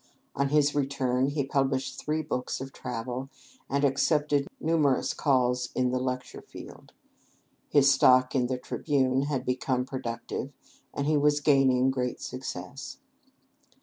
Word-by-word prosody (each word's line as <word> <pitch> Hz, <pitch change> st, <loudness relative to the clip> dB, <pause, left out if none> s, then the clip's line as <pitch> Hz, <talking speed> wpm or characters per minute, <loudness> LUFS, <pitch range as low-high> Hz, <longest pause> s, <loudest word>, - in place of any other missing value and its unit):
On 140 Hz, +1 st, +1 dB
his 150 Hz, 0 st, +3 dB
return, 135 Hz, -2 st, 0 dB
he 140 Hz, -1 st, -1 dB
published 135 Hz, -1 st, -1 dB
three 155 Hz, +1 st, -2 dB
books 125 Hz, -4 st, -3 dB
of 135 Hz, +1 st, -7 dB
travel, 125 Hz, +2 st, -5 dB, 0.4 s
and 140 Hz, +1 st, +1 dB
accepted 145 Hz, +1 st, +1 dB
numerous 155 Hz, -5 st, +1 dB
calls 125 Hz, -3 st, +1 dB
in 125 Hz, -1 st, +1 dB
the 130 Hz, -, 0 dB
lecture 125 Hz, 0 st, -4 dB
field. -, -, -12 dB, 0.8 s
His 140 Hz, -1 st, +5 dB
stock 130 Hz, -1 st, +5 dB
in 125 Hz, -2 st, +1 dB
the 130 Hz, 0 st, -2 dB
"Tribune" 130 Hz, 0 st, 0 dB
had 135 Hz, -4 st, -2 dB
become 125 Hz, 0 st, -1 dB
productive, 130 Hz, +1 st, -5 dB, 0.4 s
and 140 Hz, -, -3 dB
he 155 Hz, 0 st, +2 dB
was 145 Hz, 0 st, +3 dB
gaining 135 Hz, -3 st, +3 dB
great 125 Hz, -2 st, -2 dB
success. 130 Hz, -1 st, -7 dB
135 Hz, 135 wpm, -28 LUFS, 125-140 Hz, 0.8 s, His